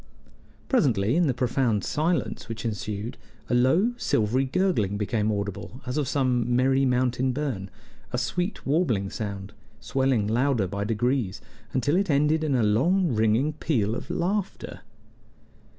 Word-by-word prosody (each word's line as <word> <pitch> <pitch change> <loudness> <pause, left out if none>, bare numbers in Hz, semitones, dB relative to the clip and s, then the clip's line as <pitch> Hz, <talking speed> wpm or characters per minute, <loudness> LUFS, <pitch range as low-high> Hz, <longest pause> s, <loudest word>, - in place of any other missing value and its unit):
Presently, 120 - +2
in 175 -1 +3
the 135 - +2
profound 125 -4 +1
silence 160 -6 -1
which 115 +1 -5
ensued, 105 0 -4 0.3
a - - +2
low, 160 - +3
silvery 125 - +1
gurgling 130 - 0
became 105 +1 0
audible, 100 +3 -4
as 125 +1 -3
of 150 -3 0
some 125 -3 +1
merry 135 +2 +3
mountain 125 0 +1
burn 125 -9 -3 0.4
a 125 - -1
sweet, 175 - -2
warbling 130 - +1
sound, 100 -1 -5 0.3
swelling 130 -5 +1
louder 120 0 +1
by 100 +2 -3
degrees 115 -1 0 0.3
until 135 +5 +1
it 195 0 +1
ended 150 +2 +2
in 145 -4 +1
a 120 - +2
long 150 - +2
ringing 110 +7 +2
peal 115 -9 0
of - - -6
laughter. 195 +3 -2
125 Hz, 140 wpm, -26 LUFS, 110-145 Hz, 0.4 s, in